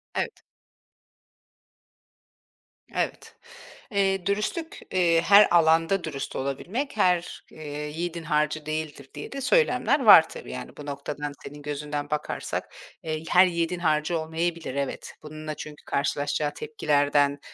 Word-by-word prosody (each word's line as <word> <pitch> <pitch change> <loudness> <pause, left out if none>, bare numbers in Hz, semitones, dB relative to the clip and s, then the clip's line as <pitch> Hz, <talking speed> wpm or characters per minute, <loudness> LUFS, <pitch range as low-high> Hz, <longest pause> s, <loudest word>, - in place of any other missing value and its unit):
Evet. - - -3 2.5
Evet. - - -3 0.6
Eee, 195 -2 +1
"Dürüstlük, 215 - -2
eee, 170 -3 +3
her 200 +3 +7
alanda 165 +2 +4
dürüst 140 -4 -5
olabilmek, 190 - -3
her, 180 -3 +1
eee, 150 -1 -6
yiğidin 170 +2 -4
harcı 150 -1 0
değildir." 155 -3 -5
diye 145 - -8
de 275 - -5
söylemler 280 - +3
var 165 -8 +9
tabii. - - -9
Yani, 125 - -8
bu 145 - -8
noktadan, 145 +1 -5
senin 145 +1 -9
gözünden 145 0 -4
bakarsak, 150 0 -3 0.3
eee, 155 -1 -3
her 180 +1 +7
yiğidin 170 0 -1
harcı 160 0 +1
olmayabilir, 160 -2 -3
evet. 140 -1 -4
Bununla 155 0 -6
çünkü 150 0 -10
karşılaşacağı 145 +1 -1
tepkilerden, 145 - +1
160 Hz, 120 wpm, -26 LUFS, 145-180 Hz, 2.5 s, var